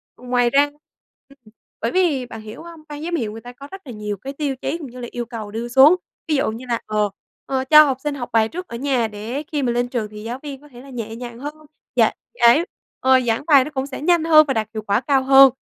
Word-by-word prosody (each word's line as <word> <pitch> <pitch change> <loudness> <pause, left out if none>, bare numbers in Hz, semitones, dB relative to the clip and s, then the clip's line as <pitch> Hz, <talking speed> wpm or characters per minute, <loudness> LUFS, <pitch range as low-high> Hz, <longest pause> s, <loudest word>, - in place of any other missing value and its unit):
Ừ, - - -19
ngoài 245 -1 +2
ra 280 +3 +4 0.6
ừm, 275 - -19 0.4
bởi - - -1
vì 330 -9 +1
bạn 225 -2 -9
hiểu 215 +8 -10
hông? 335 -2 -12
Ban 295 +1 -7
giám 345 +1 -2
hiệu 225 -9 -2
người 225 +1 -9
ta 245 - -10
có 280 +3 -12
rất 385 0 -9
là 250 - -6
nhiều 210 -1 -4
cái 270 +8 -7
tiêu 280 -2 -2
chí 330 - -2
cũng 305 - -8
như 250 - -10
là 240 - -5
yêu 240 -1 -4
cầu 225 -3 -7
đưa 230 +2 -4
xuống, 270 +8 +7 0.3
ví 305 - +1
dụ 270 - +1
như 230 +3 -8
là, 235 - 0
ờ, 210 -1 0 0.4
ờ, 265 -1 -1
cho 305 +3 +9
học 270 -2 -1
sinh 295 -1 -2
học 245 -3 -6
bài 220 -1 +4
trước 360 +2 -7
ở - - -7
nhà 260 -3 0
để 220 +7 -5
khi 290 -3 -1
mà 245 - +1
lên 245 +1 0
trường 240 -4 -3
thì 210 0 -9
giáo 240 +3 -5
viên 280 -2 -7
có 295 - -16
thể 245 -2 -13
là 275 - -14
nhẹ 225 -3 -6
nhàng 240 0 -8
hơn, 290 +3 -5 0.4
dạ - - +4 0.3
giải 245 +8 +6 0.4
ờ, 260 0 +5
giảng 225 +3 0
bài 280 -5 +7
nó - - -6
cũng 270 -1 -3
sẽ 275 - -7
nhanh 340 +1 +3
hơn 310 -2 +7
và 270 - +1
đạt 220 -3 -1
hiệu 215 - -4
quả 205 +2 +1
cao 270 -1 +2
hơn. 270 0 +8
260 Hz, 275 wpm, -21 LUFS, 230-290 Hz, 0.6 s, cho